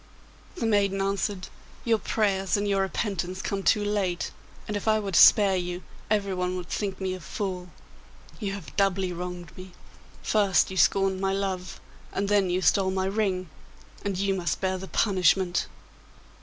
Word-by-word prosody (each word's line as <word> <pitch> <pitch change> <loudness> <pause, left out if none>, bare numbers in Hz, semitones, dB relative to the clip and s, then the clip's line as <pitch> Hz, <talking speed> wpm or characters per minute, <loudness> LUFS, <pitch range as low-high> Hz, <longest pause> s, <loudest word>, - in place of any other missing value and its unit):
The 360 - -3
maiden 200 -3 +2
answered, 195 -1 -1 0.4
'Your 225 -2 +3
prayers 195 -3 0
and 205 0 -1
your 195 -1 +2
repentance 190 -1 -2
come 195 0 -2
too 205 +1 +2
late, 195 -4 -1 0.4
and 210 - -3
if 205 - -4
I 215 0 +4
were 200 -2 -4
to 175 - +4
spare 200 -4 +7
you 180 0 -3 0.3
everyone 190 -3 0
would 175 -1 -7
think 200 -2 -3
me 190 -1 -2
a 185 - -6
fool. 180 +1 -4 0.7
You 200 -4 -3
have 200 -4 -9
doubly 195 -2 +1
wronged 175 -1 -7
me; 185 0 -11 0.5
first 200 -3 +3
you 190 - -5
scorned 195 +2 +3
my 195 0 +1
love, 190 -2 -3 0.3
and 200 0 -2
then 200 -3 +3
you 180 +1 0
stole 190 +5 +3
my 190 0 -1
ring, 190 -2 -1 0.6
and 200 -2 -2
you 195 +1 +1
must 170 -6 -1
bear 190 -1 -1
the 190 - -7
punishment. 185 -3 +2
195 Hz, 170 wpm, -26 LUFS, 185-200 Hz, 0.7 s, spare